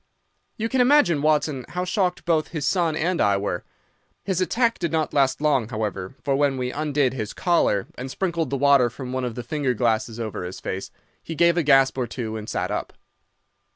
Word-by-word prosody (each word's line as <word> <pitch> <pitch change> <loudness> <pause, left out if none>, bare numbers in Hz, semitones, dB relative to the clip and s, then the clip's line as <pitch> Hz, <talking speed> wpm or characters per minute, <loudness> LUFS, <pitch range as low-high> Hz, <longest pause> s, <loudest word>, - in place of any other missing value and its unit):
"You 225 - -1
can 260 +2 +1
imagine, 250 - +4
Watson, 150 -3 +1
how 180 +1 -3
shocked 185 -1 -1
both 160 -3 +1
his 155 -4 -4
son 170 -2 +1
and 170 +3 0
I 100 -1 +3
were. 100 -3 -3 0.6
His 190 -2 -1
attack 230 +5 +1
did 170 -3 -1
not 160 -1 -1
last 135 -1 +2
long, 135 -7 +2
however, 110 -2 -4
for 140 - +1
when 140 -1 +1
we 125 -1 -2
undid 145 -3 0
his 110 -4 -4
collar, 170 - +1
and 130 +2 -7
sprinkled 170 -1 -2
the 140 - -1
water 140 -3 +4
from 125 +1 -7
one 130 -1 -1
of 120 -2 -4
the 125 - -5
finger 135 0 -1
glasses 115 0 0
over 110 -5 -4
his 90 +1 -6
face, 95 +1 -5 0.3
he 165 - -7
gave 170 +1 +4
a 175 - +2
gasp 135 -3 +4
or 125 - -1
two 115 -2 -5
and 110 -1 -6
sat - - -2
up. - - -3
140 Hz, 205 wpm, -24 LUFS, 120-170 Hz, 0.6 s, imagine